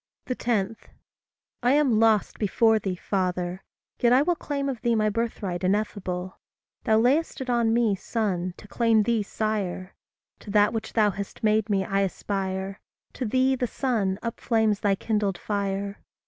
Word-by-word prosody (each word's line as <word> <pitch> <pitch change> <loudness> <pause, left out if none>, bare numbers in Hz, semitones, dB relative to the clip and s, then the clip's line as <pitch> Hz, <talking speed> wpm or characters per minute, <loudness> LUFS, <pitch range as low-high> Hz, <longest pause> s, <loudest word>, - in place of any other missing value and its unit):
10. 225 -4 -1 0.9
I 245 +2 +3
am 275 -7 +3
lost 220 -2 +2
before 220 +1 +3
thee, 190 -3 -3
Father! 180 -1 -2 0.4
yet 240 - +4
I 260 +3 +6
will 350 - +2
Claim 280 -3 -3
of 255 -5 -3
thee 235 -1 +2
my 215 -1 +2
birthright 205 -5 -3
ineffable. 190 -2 -2 0.5
Thou 220 -3 +4
lay'st 275 +8 +2
it 260 -2 -2
on 235 -2 +2
me, 230 -2 +3
son, 185 -3 -2
to - - -13
claim 225 -1 +3
thee, 230 0 +1
sire; 200 -3 -3 0.5
To - - -12
that 205 +1 +4
which 220 -1 -4
thou 210 -2 +3
hast 200 +3 -7
made 215 0 +2
me, 195 -2 +1
I 195 +1 0
aspire; 195 0 -3 0.3
To 255 - -4
thee, 260 +3 +2
the 250 -1 -1
sun, 215 -8 -1
upflames 225 -2 0
thy 200 -1 +2
kindled 205 -3 -1
fire. 200 -1 -3
215 Hz, 160 wpm, -26 LUFS, 195-235 Hz, 0.9 s, I